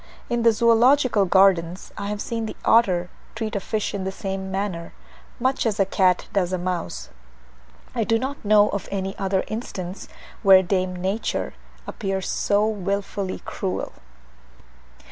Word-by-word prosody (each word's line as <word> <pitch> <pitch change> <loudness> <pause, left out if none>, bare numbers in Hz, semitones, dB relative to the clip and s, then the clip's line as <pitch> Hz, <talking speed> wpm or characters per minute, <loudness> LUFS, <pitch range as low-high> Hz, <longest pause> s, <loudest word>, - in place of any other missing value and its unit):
In 240 0 +1
the 230 0 +6
Zoological 235 0 +4
Gardens 185 -2 +3
I 200 - -5
have 210 0 -3
seen 230 -1 -3
the - - -6
otter 180 -6 +3 0.2
treat 220 -2 -3
a - - +1
fish 215 +2 -2
in 200 -2 -3
the 190 - -2
same 190 -1 -4
manner, 190 -3 -3 0.5
much 260 +1 +1
as 220 -2 -1
a 195 - +4
cat 185 -1 +2
does 185 -3 +1
a 185 - 0
mouse: 180 -1 -4 0.8
I 235 -2 0
do 225 +1 +2
not 265 +4 -4
know 210 0 +5
of 200 - -4
any 195 0 -3
other 190 -1 0
instance 195 -4 -6 0.3
where 190 -2 +7
dame 185 0 0
Nature 190 +5 -2 0.3
appears 195 -3 -3
so 205 +1 +1
wilfully 200 -2 -3
cruel. 190 -2 -3
200 Hz, 150 wpm, -23 LUFS, 185-220 Hz, 0.8 s, where